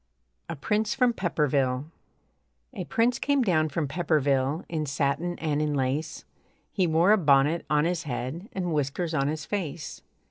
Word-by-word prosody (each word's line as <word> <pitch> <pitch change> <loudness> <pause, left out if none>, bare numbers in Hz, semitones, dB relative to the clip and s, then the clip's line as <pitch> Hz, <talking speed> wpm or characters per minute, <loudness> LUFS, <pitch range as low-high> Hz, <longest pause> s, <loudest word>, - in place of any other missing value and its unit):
A - - -3
PRINCE 210 0 0
FROM 250 -2 +3
PEPPERVILLE 140 - 0 0.9
A - - -5
prince 235 +2 +1
came 285 -2 +2
down 155 -7 +2
from 150 0 -2
Pepperville 145 -2 0
In 155 -3 -3
satin 140 +5 -1
and 150 -2 -1
in 150 -1 0
lace, 140 +4 -2 0.5
He 185 -3 +1
wore 165 +5 +4
a 215 - +5
bonnet 145 +1 +3
on 150 0 +3
his 175 -1 0
head 135 - -4
And 180 -3 -2
whiskers 150 +4 -1
on 140 -3 +1
his 155 -1 -3
face. 170 -6 -4
155 Hz, 155 wpm, -27 LUFS, 140-175 Hz, 0.9 s, a